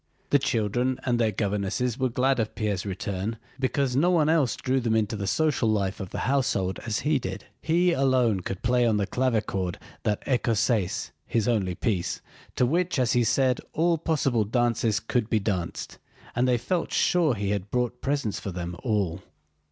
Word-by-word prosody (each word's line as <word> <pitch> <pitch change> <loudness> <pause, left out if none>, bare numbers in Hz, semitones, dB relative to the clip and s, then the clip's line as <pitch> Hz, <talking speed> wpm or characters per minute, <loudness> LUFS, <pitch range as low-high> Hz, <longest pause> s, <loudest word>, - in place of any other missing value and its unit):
The 145 - +5
children 125 +1 0
and 120 -2 +1
their 110 -2 +2
governesses 105 +4 -1
were 130 -1 +2
glad 130 +2 +1
of 110 -1 -2
Pierre's 105 -3 -2
return 100 +3 -3 0.2
because 135 -1 0
no 160 +7 +4
one 160 -4 +3
else 155 -6 +3
drew 130 +1 0
them 115 -3 0
into 110 0 +1
the 100 -2 -3
social 150 -3 +1
life 100 -3 0
of 95 - -5
the - - -4
household 120 -8 0
as 110 -1 -1
he 150 -1 +2
did. 95 -3 -6 0.2
He 175 +2 +3
alone 130 - +2
could 95 +1 -5
play 125 0 +3
on 110 -2 +2
the 100 - +1
clavichord 105 -6 -1 0.2
that 105 -1 -1
écossaise 115 -6 +1 0.2
(his 115 -3 0
only 100 -7 +1
piece) 95 -5 -1 0.4
to 125 - +3
which, 170 +6 +1
as 125 -1 +2
he 120 -1 +3
said, 130 +2 +2
all 165 +1 +2
possible 135 -8 +1
dances 115 -1 +1
could 120 -3 -1
be 110 - +3
danced, 95 -5 -3 0.4
and 125 +2 +2
they 125 -1 +3
felt 170 +8 -2
sure 165 -8 +3
he 100 -1 -2
had 100 -1 -2
brought 125 +1 -1
presents 140 -7 -1
for 100 - -5
them 85 0 -5
all. 100 -7 -1
115 Hz, 185 wpm, -26 LUFS, 100-130 Hz, 0.4 s, The